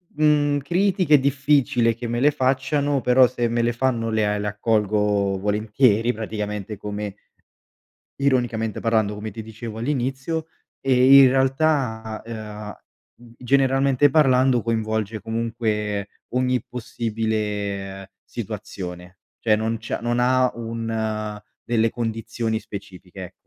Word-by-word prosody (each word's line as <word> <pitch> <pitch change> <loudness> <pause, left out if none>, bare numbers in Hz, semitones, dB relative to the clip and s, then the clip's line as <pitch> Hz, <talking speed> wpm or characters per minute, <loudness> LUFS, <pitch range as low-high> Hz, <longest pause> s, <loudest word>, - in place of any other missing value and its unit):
mhmm, 145 -1 +3
critiche 175 +1 +3
difficile 135 -3 +2
che 120 +1 -6
me 120 +1 -1
le 145 +2 +5
facciano, 135 +1 0
però 125 +1 +5
se 120 -1 -1
me 120 0 0
le 120 +1 +1
fanno 120 -2 0
le 110 -1 +1
a 105 0 0
le 105 0 -3
accolgo 105 -2 +1
volentieri, 105 +3 +2
praticamente 105 -1 -5
come 105 0 -5 1.0
ironicamente 120 -5 0
parlando 110 -3 +1
come 105 +1 -6
ti 110 +2 -7
dicevo 110 0 -8
all'inizio, 135 +5 -2 0.3
e 135 +1 +6
in 135 - +8
realtà, 130 -5 0
uhm, 110 +1 -10
generalmente 135 +2 +3
parlando, 130 -4 +3
coinvolge 110 -1 -2
comunque 110 -3 -2 0.2
ogni 125 -1 0
possibile 105 -5 -3
situazione, 95 -5 -7 0.2
cioè 110 -2 +3
non 110 +1 -1
c'è 110 - -4
non 120 +1 0
ha 130 +1 +3
un 110 -2 -3 0.2
delle 115 -1 +1
condizioni 115 -1 -3
specifiche, 95 -3 -10
e 90 - -9
115 Hz, 120 wpm, -23 LUFS, 105-130 Hz, 1.0 s, in